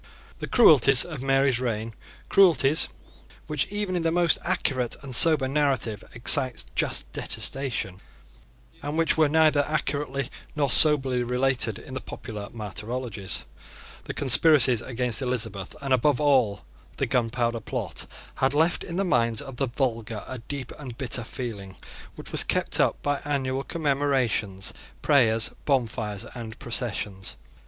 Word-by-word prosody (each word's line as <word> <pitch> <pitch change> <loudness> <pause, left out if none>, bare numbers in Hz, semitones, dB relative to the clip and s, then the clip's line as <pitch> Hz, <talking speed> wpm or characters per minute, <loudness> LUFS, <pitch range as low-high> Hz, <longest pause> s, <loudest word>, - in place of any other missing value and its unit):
The - - -5
cruelties 135 - +5
of 155 -7 -7
Mary's 135 -2 +2
reign, 115 -2 -3 0.3
cruelties 165 -6 +4 0.6
which 150 -2 -2
even 205 -2 -3
in 175 - -1
the 165 - +1
most 175 0 +3
accurate 135 -9 -1
and 135 -2 -8
sober 155 -2 +8
narrative 135 -7 -1
excite 130 +1 +4
just - - -2
detestation, 120 -8 -3 0.8
and 145 +2 -4
which 165 -1 +2
were 155 -2 +3
neither 155 -2 +3
accurately 140 -3 -3 0.2
nor 140 -3 0
soberly 135 -5 +6
related 125 -2 0
in 130 - -12
the 130 - -5
popular 105 -2 -8
martyrologies, 110 0 -5 0.6
the - - -5
conspiracies 130 -3 +5
against 125 0 -2
Elizabeth, 110 -7 -3
and 135 -1 0
above 130 +1 +2
all 130 -9 +1 0.3
the - - 0
Gunpowder 120 -1 -1
Plot, - - -5 0.3
had 135 +2 0
left 160 +3 +1
in 170 - -7
the 195 +2 0
minds 115 -8 +1
of 135 -2 -7
the 135 - -1
vulgar 115 -4 -3
a 130 - -7
deep 135 +2 -7
and 125 -5 -9
bitter 120 -2 -2
feeling 110 -6 -7 0.4
which - - -11
was - - -1
kept - - 0
up - - +1
by 145 0 -1
annual 135 -2 -2
commemorations, 135 - -1 0.3
prayers, 115 -6 +3 0.2
bonfires, 115 -6 -1
and 115 -3 -8
processions. 105 -5 -3
130 Hz, 140 wpm, -25 LUFS, 115-145 Hz, 0.8 s, sober